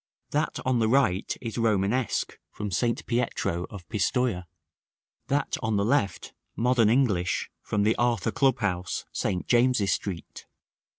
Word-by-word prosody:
That 150 +2 0
on 130 -2 +2
the 110 - +2
right 115 -8 +2
is 115 -1 -4
Romanesque, 110 +2 0
from 105 -1 -5
St. 115 +6 0
Pietro 115 -8 -1
of 95 -5 -10
Pistoja; 110 -2 0 0.8
that 145 +1 0
on 110 -1 0
the 100 - +1
left, 110 -6 0 0.2
modern 120 -2 +3
English, 110 -8 +1
from 105 -1 -1
the 110 +2 +3
Arthur 120 -1 +1
Club 135 0 +2
house, 90 -2 -2
St. 90 -3 -2
James's 120 -5 +3
Street. 95 -5 -6
110 Hz, 135 wpm, -27 LUFS, 100-125 Hz, 0.8 s, modern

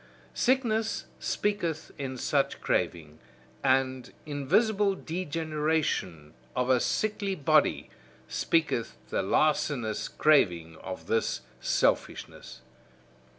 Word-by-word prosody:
Sickness 225 -4 +1
speaketh 175 -7 -1
in 135 -2 -5
such 140 +2 0
craving, 80 -2 -1 0.4
and 130 -1 +1
invisible 195 - +2
degeneration; 155 - -2 0.2
of 125 +1 +1
a 125 - +5
sickly 205 - -1
body, 145 - +2 0.4
speaketh 115 - 0
the - - 0
larcenous 120 +1 +1
craving 90 - +2
of 90 -2 -7
this 85 - 0 0.2
selfishness. 65 - -1
145 Hz, 85 wpm, -28 LUFS, 110-170 Hz, 0.4 s, a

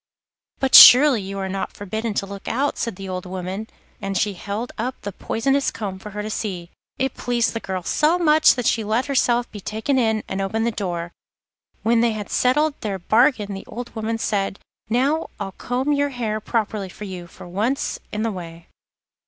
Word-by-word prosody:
'But 270 -1 -1
surely 255 -2 +10
you 195 +1 -6
are 195 -1 -2
not 195 0 -4
forbidden 220 +2 -4
to 195 - 0
look 200 0 -9
out?' 280 +4 -1
said 230 -4 -2
the 195 0 -8
old 185 -1 -5
woman, 185 +3 -5 0.3
and 195 0 -2
she 205 +2 +1
held 205 +6 -5
up 250 +3 -4
the 200 - -5
poisonous 270 +8 0
comb 200 -4 -5
for 210 - -9
her 210 0 -5
to 215 - -4
see. 180 -6 -4 0.3
It 265 0 -1
pleased 240 -1 0
the 230 - -2
girl 190 -4 -4
so 305 - +2
much 310 -3 +5
that 245 -3 -3
she 225 - +2
let 220 +5 0
herself 245 -3 +1
be 210 - -8
taken 220 +7 -1
in, 220 -3 +1
and 190 +1 -3
opened 220 +4 -1
the 235 - +1
door. 175 -5 -4 0.7
When 230 0 +3
they 235 -1 +2
had 210 -2 -6
settled 295 +5 +2
their 200 -3 -2
bargain 215 +2 +2
the 195 - -7
old 240 +1 -7
woman 225 +1 -2
said: 200 -3 -1 0.3
'Now 275 +7 +1
I'll 195 -1 -4
comb 255 +8 -1
your 285 0 +1
hair 225 -5 -3
properly 215 -3 -2
for 210 - -10
you, 185 -3 -7
for 170 - -13
once 225 +11 -1
in 210 +1 -2
the 225 - 0
way. 170 -3 -9
215 Hz, 200 wpm, -22 LUFS, 195-245 Hz, 0.7 s, surely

